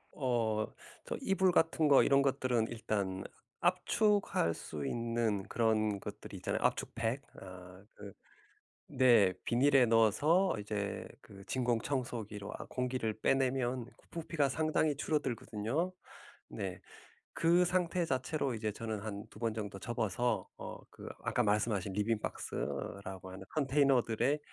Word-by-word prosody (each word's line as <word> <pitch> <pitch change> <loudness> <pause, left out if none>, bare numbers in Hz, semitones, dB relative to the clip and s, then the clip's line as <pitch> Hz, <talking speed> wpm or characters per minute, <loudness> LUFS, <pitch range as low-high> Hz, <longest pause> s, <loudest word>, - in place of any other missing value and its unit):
어 115 -5 0 0.4
저 - - -3
이불 190 -1 +3
같은 160 -1 +3
거 140 - +7
이런 140 0 +4
것들은 130 -4 +1
일단 100 -4 -2 0.4
압축할 205 - +2
수 75 -3 -6
있는 115 -4 0
그런 110 -3 +1
것들이 - - -8
있잖아요. - - -2
압축팩 120 +4 0 0.2
어 90 0 -11
그 100 -1 -10 0.8
네. 115 -8 +6
비닐에 130 +1 +5
넣어서 120 - +4
이제 105 -1 -3
그 100 -4 -13
진공 120 -3 0
청소기로 115 -7 -3
아 - - -7
공기를 125 -4 -2
빼내면 130 -2 +1
그 - - -25
부피가 160 -4 0
상당히 155 0 +1
줄어들거든요. 135 - -1 0.6
네. - - -5 0.5
그 175 +1 +4
상태 180 -1 +1
자체로 135 -1 -1
이제 110 -1 -2
저는 110 -1 -4
한 105 -1 -5
2 - - -14
번 115 -2 0
정도 100 -3 -5
접어서 120 +2 -1
어 - - -7
그 - - -10 0.2
아까 120 - +1
말씀하신 105 -2 +1
리빙 105 +1 +1
박스라고 95 -1 -5
하는 95 +1 -9
컨테이너들의 135 -2 +2
120 Hz, 270 characters per minute, -33 LUFS, 105-140 Hz, 0.8 s, 거